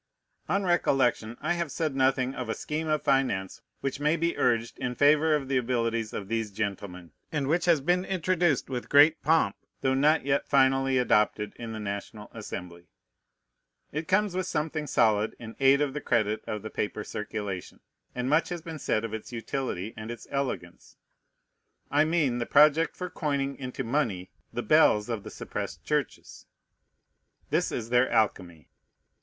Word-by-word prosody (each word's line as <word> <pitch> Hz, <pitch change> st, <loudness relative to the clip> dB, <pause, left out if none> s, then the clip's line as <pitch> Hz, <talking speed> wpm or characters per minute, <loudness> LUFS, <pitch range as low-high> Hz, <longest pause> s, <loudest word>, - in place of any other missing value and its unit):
On 195 Hz, +4 st, +1 dB
recollection, 135 Hz, -, +1 dB
I 155 Hz, +4 st, +1 dB
have 170 Hz, -4 st, -3 dB
said 155 Hz, -1 st, -2 dB
nothing 130 Hz, -1 st, +2 dB
of 125 Hz, -4 st, -5 dB
a -, -, -1 dB
scheme 155 Hz, +1 st, -3 dB
of 155 Hz, -1 st, 0 dB
finance 130 Hz, -9 st, 0 dB, 0.2 s
which 135 Hz, 0 st, -3 dB
may 150 Hz, +2 st, +2 dB
be 170 Hz, +1 st, 0 dB
urged 115 Hz, -2 st, 0 dB
in 125 Hz, 0 st, -3 dB
favor 150 Hz, +3 st, +4 dB
of 140 Hz, -3 st, -3 dB
the 135 Hz, -1 st, +1 dB
abilities 115 Hz, -2 st, -1 dB
of 100 Hz, -, -5 dB
these 115 Hz, 0 st, -1 dB
gentlemen, 95 Hz, -4 st, -5 dB, 0.2 s
and 150 Hz, -3 st, -1 dB
which 165 Hz, +4 st, +1 dB
has 170 Hz, -5 st, +4 dB
been 180 Hz, +5 st, +2 dB
introduced 180 Hz, -5 st, +1 dB
with 125 Hz, -2 st, -5 dB
great 150 Hz, +3 st, +6 dB
pomp, 160 Hz, +2 st, +2 dB, 0.3 s
though 130 Hz, -1 st, +2 dB
not 150 Hz, +2 st, +3 dB
yet 140 Hz, 0 st, +1 dB
finally 135 Hz, -1 st, +3 dB
adopted 105 Hz, -4 st, +2 dB
in 115 Hz, -1 st, -6 dB
the 110 Hz, -, -5 dB
National 105 Hz, +1 st, -6 dB
Assembly. 90 Hz, -5 st, -8 dB, 1.0 s
It 155 Hz, +2 st, -4 dB
comes 205 Hz, 0 st, +2 dB
with 185 Hz, -1 st, -1 dB
something 155 Hz, -1 st, -2 dB
solid 110 Hz, -4 st, +2 dB
in 115 Hz, -1 st, -9 dB
aid 135 Hz, +1 st, +5 dB
of 145 Hz, -2 st, 0 dB
the 150 Hz, -, -4 dB
credit 110 Hz, -4 st, 0 dB
of 105 Hz, -1 st, -4 dB
the 110 Hz, -, -6 dB
paper 105 Hz, -, -3 dB
circulation; 100 Hz, -4 st, -5 dB, 0.4 s
and 125 Hz, 0 st, -2 dB
much 155 Hz, +4 st, +2 dB
has 175 Hz, -2 st, -5 dB
been 165 Hz, -2 st, -7 dB
said 110 Hz, -4 st, 0 dB
of 110 Hz, -, -6 dB
its 110 Hz, +2 st, -6 dB
utility 115 Hz, -4 st, -4 dB
and 110 Hz, +1 st, -7 dB
its 120 Hz, -1 st, -7 dB
elegance. 130 Hz, -11 st, -4 dB, 0.9 s
I 145 Hz, +2 st, +4 dB
mean 155 Hz, -7 st, +1 dB
the 120 Hz, -, -2 dB
project 150 Hz, +3 st, +5 dB
for 180 Hz, -1 st, -5 dB
coining 140 Hz, -3 st, -1 dB
into 130 Hz, 0 st, -5 dB
money 115 Hz, -8 st, -1 dB, 0.2 s
the -, -, -3 dB
bells 105 Hz, +2 st, +4 dB
of 115 Hz, -3 st, -2 dB
the -, -, -9 dB
suppressed -, -, -6 dB
churches. -, -, -3 dB, 1.0 s
This -, -, +1 dB
is 115 Hz, -1 st, -4 dB
their 125 Hz, +1 st, +4 dB
alchemy. 90 Hz, -8 st, 0 dB
130 Hz, 170 wpm, -28 LUFS, 110-150 Hz, 1.0 s, great